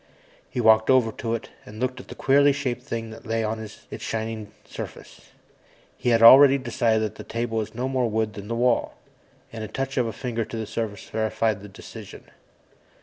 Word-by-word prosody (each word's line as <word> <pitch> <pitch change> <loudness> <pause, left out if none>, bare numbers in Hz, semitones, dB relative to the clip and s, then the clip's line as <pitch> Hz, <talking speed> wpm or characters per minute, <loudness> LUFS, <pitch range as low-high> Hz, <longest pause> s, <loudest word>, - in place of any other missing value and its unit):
He 125 - -4
walked 110 -1 +5
over 130 -4 +4
to 115 +1 -3
it 115 - -7
and 105 +1 -11
looked 130 0 -2
at - - -11
the - - -9
queerly 140 +1 +4
shaped 135 -4 -3
things 115 -1 -5
that - - -12
lay 115 -1 -1
on 110 +1 -2
its 110 -1 -10 0.2
shining 110 -2 -4
surface. - - -9 0.7
He - - -1
had 115 -1 +4
already 135 +3 +9
decided 115 -3 +1
that 110 - -3
the - - -8
table 115 -1 -2
was 110 +1 -5
no 125 +2 -2
more 130 -3 0
wood 110 0 -1
than 100 0 -8
the 115 - -2
wall, 120 0 +1 0.6
and 110 -1 -5
a - - -4
touch 135 +5 -4
of 125 -2 +2
a - - -2
finger 115 +1 -3
to 115 - -7
the 110 - -3
surface 110 -1 -5
verified 110 -2 -1
the 105 - -10
decision. 95 - -11
115 Hz, 205 wpm, -25 LUFS, 110-125 Hz, 0.7 s, already